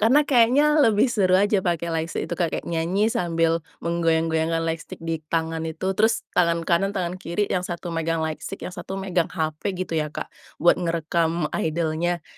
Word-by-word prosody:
karena 260 +8 +5
kayaknya, 275 +3 +4
lebih 220 -6 +4
seru 200 -7 +3
aja 205 +1 +3
pakai 170 -2 -1
lightstick 160 0 -2
itu - - -7
Kak, 170 -2 0
kayak - - -4
nyanyi 175 +6 0
sambil 165 -1 +1 0.2
menggoyang-goyangkan 165 -1 +1
lightstick 165 0 -4
di 165 -1 -2
tangan 165 0 -1
itu. 175 +4 -2
Terus, 220 +3 +2
tangan 170 -1 +2
kanan, 195 +4 +1
tangan 180 0 -3
kiri, 175 +5 -1
yang 180 - +1
1 175 -1 -5
megang 165 0 -1
lightstick, 160 +5 -5
yang - - -5
1 190 - -6
megang 185 -3 0
HP 155 -1 -3 0.2
gitu 185 -2 -4
ya, 150 - -2
Kak, 150 - -7 0.2
buat 175 +2 +3
ngerekam 165 -1 0
idol-nya. 165 +1 -1
170 Hz, 175 wpm, -24 LUFS, 165-190 Hz, 0.2 s, karena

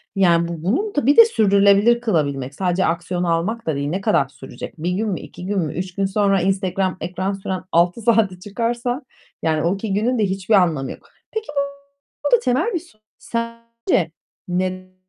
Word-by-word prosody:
Ya, 170 -3 +4
bu 170 -2 -6
bunun 375 - 0
bir 285 - +4
de 460 - +11
sürdürülebilir 205 - +4
kılabilmek 140 - -1
sadece 185 0 +1
aksiyon 175 +1 -1
almak 175 +7 -1
da 155 - +1
değil. 140 +1 -2
Ne 190 +4 -2
kadar 150 -8 +2
sürecek? 125 -2 -9
1 170 +3 -2
gün 210 +4 -1
mü, 180 - -2
2 180 - -10
gün 200 0 0
mü? 155 -4 -2
3 180 +1 -5
gün 195 -1 +1
sonra 195 -1 +2
Instagram 190 0 0
ekran 185 +3 -2
süren 190 -1 -4
6 175 +6 +2
saate 215 -5 +2
çıkarsa 240 +6 -2 0.4
yani 155 -1 +1
o 170 +3 +1
2 200 0 -3
günün 230 +4 +1
de 215 - +3
hiçbir 195 +2 -1
anlamı 160 -8 +2
yok. - - -12 0.2
Peki 440 0 -4 0.8
bu - - -1
da - - -7
temel 295 - 0
bir 345 - 0
sorun 260 -11 -21
sence 230 0 -4 0.5
neden 185 +1 -2
195 Hz, 185 wpm, -21 LUFS, 175-230 Hz, 0.8 s, de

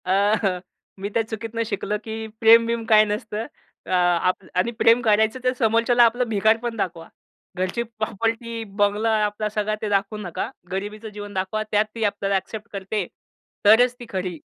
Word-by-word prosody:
अ, 185 - -1 0.3
हं. 185 -3 +1 0.4
मी 200 - -3
त्या 225 - +1
चुकीतनं 225 +1 -4
शिकलं, 210 -1 -2
की 220 0 -5
प्रेम-बिम 230 +1 +5
काय 215 -1 +6
नसतं. 210 +1 -3 0.4
अ, - - -12
आप 180 0 +2
आणि 185 +6 +1
प्रेम 230 +2 +5
करायचं, 220 +2 +2
तर 255 0 +2
समोरच्याला 230 +1 +4
आपलं 245 +2 +1
भिकारपण 225 +2 +1
दाखवा. 170 -4 -3 0.5
घरची 185 +6 -1
प्रॉपर्टी, 225 +1 -3 0.2
बंगला, 205 +2 +2 0.2
आपला 210 +1 -2
सगळा 210 0 -1
ते 215 - -2
दाखवू 200 +1 0
नका. 195 +2 -4 0.2
गरिबीचं 210 +3 -5
जीवन 205 0 -8
दाखवा. 190 +3 -2
त्यात 210 0 +3
ती 225 - -3
आपल्याला 200 -1 0
अ‍ॅक्सेप्ट 210 +3 -4
करते, 195 0 -3 0.6
तरच 240 +4 +6
ती 240 - -8
खरी, 185 -3 -3
215 Hz, 160 wpm, -23 LUFS, 200-230 Hz, 0.6 s, काय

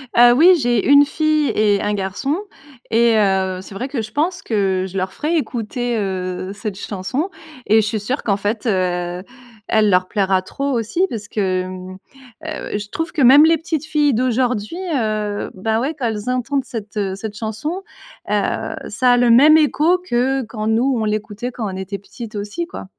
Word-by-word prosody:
Heu, 240 0 +8
oui 335 +8 +7
j'ai 240 -3 +1
1 285 0 +7
fille 310 -1 +1
et 205 -2 +2
1 210 0 -1
garçon 195 - -2 0.6
et 230 0 +4
heu, 190 -2 +1
c'est 195 - -11
vrai 245 +7 -4
que 270 -4 -3
je 215 - -9
pense 340 +7 -1
que 190 -4 0
je 190 - -12
leur 185 0 -1
ferai 325 +3 -1
écouter, 240 -3 -2
heu, 185 -2 -3
cette 205 -1 -6
chanson 220 - -3 0.3
et 220 +2 +5
je 210 - -2
suis 215 0 -1
sûre 250 +8 -3
qu'en 200 -2 0
fait, 210 +3 -2
heu, 180 -2 -1 0.4
elle 215 -1 +3
leur 185 -1 +3
plaira 190 -3 +1
trop 275 +8 -3
aussi 255 - 0
parce 210 -3 -6
que, 185 -4 -1 0.8
heu, 315 -8 -4
je 205 0 -7
trouve 325 +1 -3
que 310 - -2
même 275 +5 +8
les 325 0 +4
petites 320 -3 -3
filles 300 -2 +2
d'aujourd'hui, 250 +2 0 0.2
heu, 215 -4 -1
ben, 220 +4 0
ouais 290 +4 -2
quand 255 - -3
elles 220 +2 -3
entendent 255 +2 -1
cette, 220 -5 -7
heu 195 -2 -1
cette 205 +1 -7
chanson, 225 - -4 0.5
heu. - - -1
Ça 250 -1 +3
a 245 - +4
le 240 -1 +4
même 300 +6 +7
écho 315 +3 +3
que 265 -5 0
quand 215 -1 -5
nous 245 +4 +2
on 220 -2 -1
l'écoutait 215 +2 -3
quand 235 -2 -5
on - - -6
était 190 +1 -5
petites 215 +2 -10
aussi 205 +12 -4
quoi. - - -8
225 Hz, 190 wpm, -19 LUFS, 205-275 Hz, 0.8 s, Heu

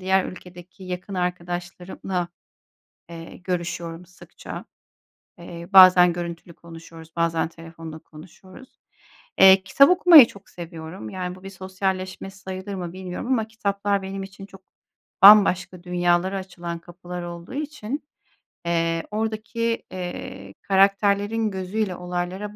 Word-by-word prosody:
diğer 190 0 +2
ülkedeki 180 +1 -11
yakın 185 +2 -6
arkadaşlarımla, 180 0 -4 0.8
eee, 165 0 -10
görüşüyorum 175 -1 -4
sıkça. 180 - -11 0.7
Eee, 170 0 -9
bazen 185 -2 +8
görüntülü 170 -1 -7
konuşuyoruz, 165 -1 -13
bazen 165 -1 0
telefonda 165 -1 -10
konuşuyoruz. 185 +10 -16 0.6
Eee, 190 0 +8
kitap 275 - +5
okumayı 350 -7 +9
çok 200 -3 -15
seviyorum. 160 -8 -9
Yani, 180 -1 -5
bu 185 - -16
bir 195 - -7
sosyalleşme 190 0 -4
sayılır 190 +1 -7
mı 175 -2 -5
bilmiyorum 185 +4 -6
ama 235 -4 +1
kitaplar 200 -2 -1
benim 195 +1 -5
için 195 0 -10
çok 195 -1 -16 0.6
bambaşka 190 -3 +7
dünyalara 175 +2 +1
açılan 175 -3 -7
kapılar 175 +1 -9
olduğu 175 +6 -8
için, 290 -3 -5 0.6
eee, 165 -1 0
oradaki, 225 +2 -2
eee, 175 - -7
karakterlerin 200 +2 +2
gözüyle 190 +1 -3
olaylara 180 +4 -5
185 Hz, 115 wpm, -23 LUFS, 175-195 Hz, 0.8 s, okumayı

